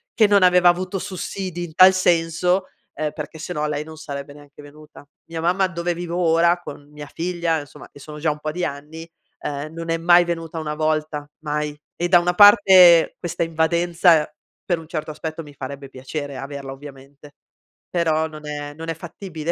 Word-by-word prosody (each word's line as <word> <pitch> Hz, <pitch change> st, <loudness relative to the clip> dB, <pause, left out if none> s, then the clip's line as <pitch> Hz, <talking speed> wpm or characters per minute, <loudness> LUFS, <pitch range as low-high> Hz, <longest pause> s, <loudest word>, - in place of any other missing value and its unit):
che 225 Hz, -, +5 dB
non 200 Hz, -1 st, +4 dB
aveva 180 Hz, -1 st, +6 dB
avuto 185 Hz, +2 st, -1 dB
sussidi 185 Hz, -2 st, -5 dB
in 160 Hz, -2 st, -13 dB
tal 185 Hz, +1 st, +8 dB
senso, 180 Hz, +1 st, +1 dB, 0.3 s
ehm, 155 Hz, -1 st, -3 dB
perché 160 Hz, -, -7 dB
se 170 Hz, +3 st, -6 dB
no 150 Hz, -2 st, -2 dB
lei 150 Hz, 0 st, -3 dB
non 160 Hz, 0 st, -12 dB
sarebbe 140 Hz, -1 st, -7 dB
neanche 145 Hz, 0 st, -15 dB
venuta. 145 Hz, 0 st, -15 dB, 0.2 s
Mia 165 Hz, 0 st, -6 dB
mamma 185 Hz, +3 st, +2 dB
dove 175 Hz, -1 st, -3 dB
vivo 175 Hz, 0 st, -5 dB
ora 170 Hz, 0 st, +3 dB
con 145 Hz, -3 st, -11 dB
mia 150 Hz, 0 st, -9 dB
figlia, 170 Hz, -2 st, -1 dB
insomma, 145 Hz, 0 st, -12 dB
e 145 Hz, -, -15 dB
sono 150 Hz, +2 st, -10 dB
già 155 Hz, 0 st, +1 dB
un 150 Hz, -, -7 dB
po' 155 Hz, 0 st, -4 dB
di 175 Hz, +2 st, -2 dB
anni, 150 Hz, +4 st, -7 dB, 0.3 s
ehm, 145 Hz, +1 st, -5 dB
non 165 Hz, 0 st, -4 dB
è 165 Hz, -, +1 dB
mai 175 Hz, +1 st, +5 dB
venuta 165 Hz, -1 st, -4 dB
una 150 Hz, -1 st, -3 dB
volta, 155 Hz, -1 st, -2 dB
mai 150 Hz, -1 st, -3 dB, 0.2 s
e 175 Hz, -, -1 dB
da 180 Hz, -, +7 dB
una 175 Hz, +1 st, 0 dB
parte 190 Hz, -4 st, +7 dB
questa 170 Hz, -1 st, -3 dB
invadenza, 165 Hz, 0 st, +2 dB, 0.4 s
per 175 Hz, -3 st, 0 dB
un 160 Hz, -, -12 dB
certo 155 Hz, -2 st, -5 dB
aspetto, 160 Hz, +1 st, -6 dB
mi 145 Hz, -, -14 dB
farebbe 140 Hz, 0 st, -8 dB
piacere 140 Hz, +2 st, -6 dB
averla, 140 Hz, 0 st, -7 dB
ovviamente, 140 Hz, +1 st, -13 dB, 0.5 s
però 160 Hz, -2 st, +1 dB
non 155 Hz, -1 st, -11 dB
è 145 Hz, 0 st, -6 dB
non 165 Hz, +1 st, -7 dB
è 165 Hz, -, -2 dB
fattibile 170 Hz, -1 st, -6 dB
160 Hz, 190 wpm, -21 LUFS, 150-175 Hz, 0.5 s, tal